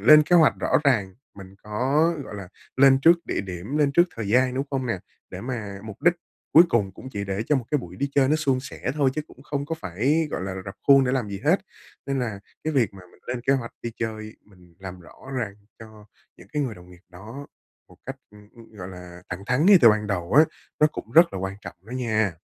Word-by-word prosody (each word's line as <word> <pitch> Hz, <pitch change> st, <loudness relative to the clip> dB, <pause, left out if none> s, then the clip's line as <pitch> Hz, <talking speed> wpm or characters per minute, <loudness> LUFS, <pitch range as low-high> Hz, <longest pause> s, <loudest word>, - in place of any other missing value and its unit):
lên 150 Hz, +8 st, +8 dB
kế 175 Hz, +3 st, +3 dB
hoạch 160 Hz, -3 st, +5 dB
rõ -, -, +2 dB
ràng, 100 Hz, -9 st, +2 dB, 0.2 s
mình 95 Hz, -1 st, -12 dB
có, 135 Hz, +10 st, +1 dB
gọi -, -, -9 dB
là, 100 Hz, -3 st, -8 dB, 0.3 s
lên 135 Hz, 0 st, +6 dB
trước 170 Hz, +2 st, +5 dB
địa -, -, -1 dB
điểm, 95 Hz, +7 st, -6 dB
lên 145 Hz, -2 st, +2 dB
trước 170 Hz, -, +6 dB
thời 110 Hz, -3 st, -4 dB
gian, 125 Hz, +3 st, +3 dB
đúng 135 Hz, +2 st, -1 dB
không 130 Hz, -2 st, -2 dB
nè? 115 Hz, -6 st, -1 dB, 0.3 s
Để -, -, -7 dB
mà 110 Hz, -6 st, -5 dB
mục 110 Hz, -2 st, -10 dB
đích 175 Hz, 0 st, +5 dB, 0.4 s
cuối 165 Hz, -, +9 dB
cùng 105 Hz, -9 st, 0 dB
cũng 130 Hz, -, -10 dB
chỉ 100 Hz, -1 st, -3 dB
để 100 Hz, +1 st, -3 dB
cho 150 Hz, -, +3 dB
một 130 Hz, -, -3 dB
cái 150 Hz, -, +2 dB
buổi 90 Hz, -7 st, -9 dB
đi 140 Hz, -, -1 dB
chơi 135 Hz, -2 st, +4 dB
nó 155 Hz, -, +3 dB
suôn 135 Hz, -4 st, +1 dB
sẻ 130 Hz, -, -5 dB
thôi, 140 Hz, -3 st, +2 dB
chứ 155 Hz, -, -2 dB
cũng 135 Hz, -, -17 dB
không 145 Hz, -1 st, -4 dB
có 165 Hz, -, -2 dB
phải, 135 Hz, -, 0 dB
gọi -, -, -3 dB
là, 95 Hz, 0 st, -4 dB
r 95 Hz, 0 st, -7 dB
rập 95 Hz, -, -8 dB
khuôn 135 Hz, -1 st, +7 dB
để 125 Hz, -, 0 dB
làm 125 Hz, -6 st, -1 dB
gì 100 Hz, -1 st, -6 dB
hết. -, -, +3 dB, 0.5 s
Nên 135 Hz, -1 st, -1 dB
là 110 Hz, -6 st, -3 dB, 0.2 s
cái 155 Hz, -, -1 dB
việc 115 Hz, -8 st, +1 dB
mà 95 Hz, -, -12 dB
mình -, -, -23 dB
lên 120 Hz, 0 st, -3 dB
kế 135 Hz, -, +2 dB
hoạch 130 Hz, -4 st, -2 dB
đi 120 Hz, -, -3 dB
chơi, 110 Hz, -1 st, -5 dB
mình 90 Hz, -4 st, -21 dB
làm 95 Hz, -1 st, -9 dB
rõ 85 Hz, -, -15 dB, 0.3 s
ràng 105 Hz, -5 st, -3 dB, 0.2 s
cho 110 Hz, -2 st, -14 dB, 0.3 s
những -, -, -16 dB
cái 150 Hz, -1 st, 0 dB
người 120 Hz, -5 st, -3 dB
đồng 90 Hz, 0 st, -15 dB
nghiệp 90 Hz, 0 st, -17 dB
đó 110 Hz, +10 st, -10 dB, 0.4 s
một -, -, -18 dB
cách, -, -, -5 dB
ưm, 105 Hz, 0 st, -17 dB
ưm, 115 Hz, -1 st, -16 dB
gọi 90 Hz, -2 st, -7 dB
là, 90 Hz, -1 st, -11 dB
thẳng 90 Hz, +3 st, -6 dB
thắn 125 Hz, +6 st, +2 dB
ngay 200 Hz, -2 st, +8 dB
từ 120 Hz, -, +8 dB
ban 105 Hz, 0 st, 0 dB
đầu 90 Hz, -3 st, -3 dB
á, 150 Hz, +4 st, +7 dB, 0.4 s
nó 150 Hz, -, +7 dB
cũng 115 Hz, -6 st, -8 dB
rất 170 Hz, +2 st, +6 dB
là -, -, -4 dB
quan 95 Hz, +1 st, -4 dB
trọng -, -, -9 dB
đó -, -, -13 dB
nha. 110 Hz, -6 st, 0 dB
115 Hz, 255 wpm, -24 LUFS, 100-140 Hz, 0.5 s, cuối